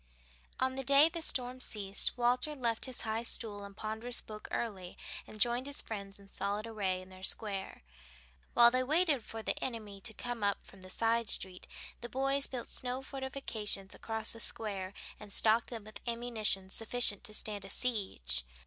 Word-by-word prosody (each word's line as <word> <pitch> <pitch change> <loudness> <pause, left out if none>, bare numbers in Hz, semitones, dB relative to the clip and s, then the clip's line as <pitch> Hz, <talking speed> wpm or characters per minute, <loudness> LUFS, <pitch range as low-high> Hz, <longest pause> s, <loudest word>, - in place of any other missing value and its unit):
On 260 0 +1
the 270 +1 -3
day 280 +4 +8
the 335 0 -5
storm 255 -4 0
ceased 200 -1 +3
Walter 250 +5 +2
left 235 -4 0
his 260 -2 -4
high 220 0 -1
stool 215 -3 0
and 200 0 -10
ponderous 220 +3 -3
book 215 -1 -8
early 190 -6 -3 0.3
and 215 - -11
joined 240 +4 +3
his 285 - +3
friends 200 -2 -6
in 200 -1 -16
solid 200 +2 -2
array 195 -5 -1
in 185 - -15
their 185 0 -13
square. 195 - -1 0.7
While 235 0 +9
they 255 +1 +2
waited 300 -1 +3
for 225 0 -7
the - - -1
enemy 215 -5 -4
to 220 - -2
come 245 -3 -4
up 200 -1 +1
from 195 - -13
the 185 - -11
side 230 +2 +1
street, 185 -1 -1 0.3
the 240 - -7
boys 275 +2 +2
built 250 -3 -5
snow 255 +1 -2
fortifications 265 -8 -3
across 220 -1 -3
the 230 - -10
Square 200 -5 -3 0.3
and 210 -1 -11
stocked 225 +3 +4
them 230 -3 -6
with 215 +1 -10
ammunition 225 -5 +1
sufficient 225 -2 +3
to 215 - -2
stand 210 -2 -1
a 195 - -9
siege. 190 - +1
225 Hz, 180 wpm, -33 LUFS, 200-245 Hz, 0.7 s, While